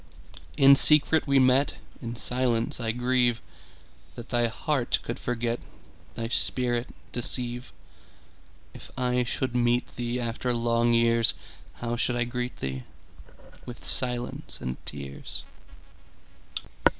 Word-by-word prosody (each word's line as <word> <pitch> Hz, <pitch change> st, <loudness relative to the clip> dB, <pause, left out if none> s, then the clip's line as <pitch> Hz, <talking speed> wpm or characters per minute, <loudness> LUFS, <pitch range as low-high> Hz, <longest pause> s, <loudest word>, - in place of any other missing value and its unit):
In 140 Hz, 0 st, +8 dB
secret 150 Hz, +2 st, +5 dB
we 140 Hz, 0 st, +4 dB
met:In 130 Hz, -2 st, +1 dB
silence 120 Hz, -1 st, +1 dB
I 115 Hz, -2 st, 0 dB
grieveThat 115 Hz, -, -3 dB
thy 120 Hz, -1 st, +2 dB
heart 130 Hz, +2 st, 0 dB
could 115 Hz, -, -5 dB
forget, 120 Hz, -1 st, -2 dB, 0.6 s
Thy 115 Hz, -, -3 dB
spirit 120 Hz, -1 st, 0 dB, 0.2 s
deceive. 120 Hz, 0 st, -1 dB, 1.0 s
If -, -, -11 dB
I 125 Hz, 0 st, +1 dB
should 125 Hz, +1 st, -2 dB
meet 120 Hz, 0 st, +1 dB
theeAfter 120 Hz, 0 st, -2 dB
long 115 Hz, 0 st, +2 dB
years, 115 Hz, -1 st, +4 dB, 0.4 s
How 120 Hz, 0 st, -3 dB
should 120 Hz, +1 st, 0 dB
I 120 Hz, -, +2 dB
greet 125 Hz, +1 st, -4 dB
thee?—With 65 Hz, -, -10 dB
silence 125 Hz, -1 st, -1 dB
and 65 Hz, 0 st, -5 dB
tears. 70 Hz, -3 st, -6 dB
120 Hz, 100 wpm, -27 LUFS, 115-125 Hz, 1.0 s, In